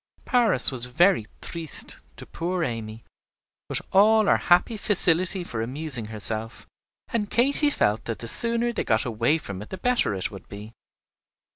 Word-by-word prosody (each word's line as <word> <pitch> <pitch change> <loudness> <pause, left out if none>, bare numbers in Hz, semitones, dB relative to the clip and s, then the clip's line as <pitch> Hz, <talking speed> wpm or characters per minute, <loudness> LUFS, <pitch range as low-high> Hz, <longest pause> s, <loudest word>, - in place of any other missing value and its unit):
Paris 225 - +2
was 125 -2 -3
very 170 - +2
triste 165 -2 -5 0.2
to - - -10
poor 175 +1 -3
Amy, 115 -3 -5 0.7
with - - -2
all 215 +2 +5
her - - +4
happy 180 +6 +2
facility 185 -2 +2
for 115 -9 -5
amusing 130 0 -2
herself; 110 +2 -3 0.4
and 210 -3 -2
Katy 280 +5 +5
felt 105 - 0
that 115 - -4
the 115 - -8
sooner 235 - -1
they - - -2
got 110 +5 +1
away 120 +6 +1
from 100 -11 -8
it 105 - -10
the 190 - -6
better 245 - +1
it 95 - -3
would 100 - -11
be. 105 +2 -10
155 Hz, 160 wpm, -25 LUFS, -, 0.7 s, all